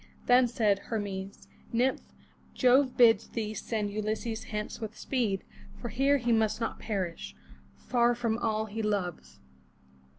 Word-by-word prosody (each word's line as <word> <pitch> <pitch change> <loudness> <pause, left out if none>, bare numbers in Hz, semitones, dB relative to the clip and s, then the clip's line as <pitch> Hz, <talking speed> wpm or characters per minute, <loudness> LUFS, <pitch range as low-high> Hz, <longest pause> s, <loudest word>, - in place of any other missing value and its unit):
Then 245 0 +5
said 215 -4 +2
Hermes: 200 -3 -4 0.2
"Nymph, 250 +3 +1 0.5
Jove 255 +1 +4
bids 235 -2 +5
thee 215 -2 -3
send 215 -1 -3
Ulysses 215 +2 -3
hence 210 +1 -5
with 215 -1 -6
speed; 225 -8 -1 0.4
for 240 - -5
here 270 +6 +3
he 240 -2 -1
must 220 -1 +2
not 230 - -3
perish, 185 - -4 0.4
far 240 -1 +2
from 230 -1 -1
all 220 -2 0
he 220 +1 -5
loves. 180 - -3
220 Hz, 135 wpm, -29 LUFS, 205-240 Hz, 0.5 s, Then